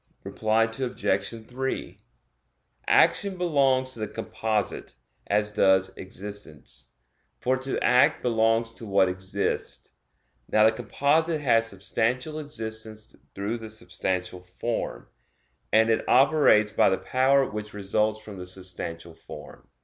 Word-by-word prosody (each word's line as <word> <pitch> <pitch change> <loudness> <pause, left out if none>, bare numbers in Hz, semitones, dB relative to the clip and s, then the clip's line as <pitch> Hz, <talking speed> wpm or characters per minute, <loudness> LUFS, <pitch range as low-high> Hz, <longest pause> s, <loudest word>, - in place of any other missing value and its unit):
Reply 110 +1 +1
Obj. 115 -2 -2
3: 130 +1 -4 0.9
Action 200 -2 +3
belongs 135 -7 +2
to 115 - -7
the 110 - -2
composite, 110 - -3 0.3
as 105 +1 +1
does 95 -2 +3
existence; 100 -4 -6 0.5
for 130 +1 +1
to 130 +1 -2
act 125 +3 +4
belongs 115 -1 +2
to 115 - -9
what 100 -1 +4
exists. 95 +2 -2 0.6
Now 110 0 +5
the 110 - +6
composite 155 +7 0
has 115 -5 +3
substantial 120 +9 -2
existence 110 -6 -6 0.2
through 105 +4 -3
the 110 -1 -8
substantial 90 -3 -4
form; 90 +6 -4 0.7
and 110 +1 +4
it 110 - 0
operates 130 -6 +5
by - - +4
the 95 - +1
power 135 +1 +2
which 105 0 -7
results 105 +2 0
from 105 -3 -10
the 90 - -6
substantial 90 -3 -7
form. - - -12
110 Hz, 120 wpm, -26 LUFS, 100-130 Hz, 0.9 s, the